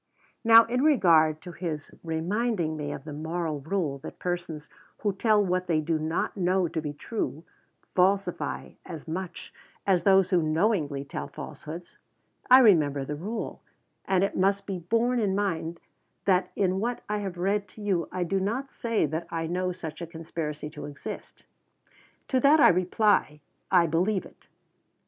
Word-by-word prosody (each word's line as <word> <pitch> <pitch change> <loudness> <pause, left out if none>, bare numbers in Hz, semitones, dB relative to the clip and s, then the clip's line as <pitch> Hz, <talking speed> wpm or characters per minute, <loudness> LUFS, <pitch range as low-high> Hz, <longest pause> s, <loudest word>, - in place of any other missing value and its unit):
Now, 230 0 +9
in 250 +2 0
regard 165 - +4
to 180 - -8
his 160 -4 -5
reminding 170 +1 -1
me 145 -1 -4
of - - -6
the 150 -1 -7
moral 160 0 -3
rule 155 -2 -2
that - - -9
persons 175 -4 -4 0.4
who 205 -2 +1
tell 210 +1 +3
what 185 0 0
they 165 -3 +2
do 155 +1 0
not 160 +2 -1
know 185 -1 +2
to 160 0 -3
be 150 -1 -4
true, 155 +1 -4 0.5
falsify 190 0 +1
as 165 -2 -9
much 175 +1 -6 0.3
as 185 -3 +3
those 190 -2 +4
who 180 -2 +4
knowingly 155 -4 0
tell - - -5
falsehoods. 170 +3 -9 0.5
I 255 +1 +9
remember 150 - +4
the 150 - -4
rule, 210 +9 -5 0.4
and 190 -1 +2
it 200 - -1
must 195 +1 +2
be 190 -2 -4
borne 230 +8 +1
in 200 -4 +1
mind 170 -4 -2 0.5
that 185 -2 +2
in 190 -2 +1
what 240 +3 -2
I 210 0 -1
have 190 -3 -5
read 200 +3 0
to 200 +4 -14
you, 185 -5 0
I 185 - -1
do 195 +3 0
not 235 +8 -2
say 230 -5 0
that 160 +3 -3
I 165 -1 -2
know 180 +2 -1
such 175 -2 -7
a 170 - -4
conspiracy 160 -2 -5
to 150 -2 -8
exist. 145 -1 -8 0.9
To 260 - +2
that 285 +4 +6
I - - +8
reply, 180 -3 +2 0.3
I 180 -3 +5
believe 180 +5 +1
it. - - -18
180 Hz, 170 wpm, -27 LUFS, 160-200 Hz, 0.9 s, Now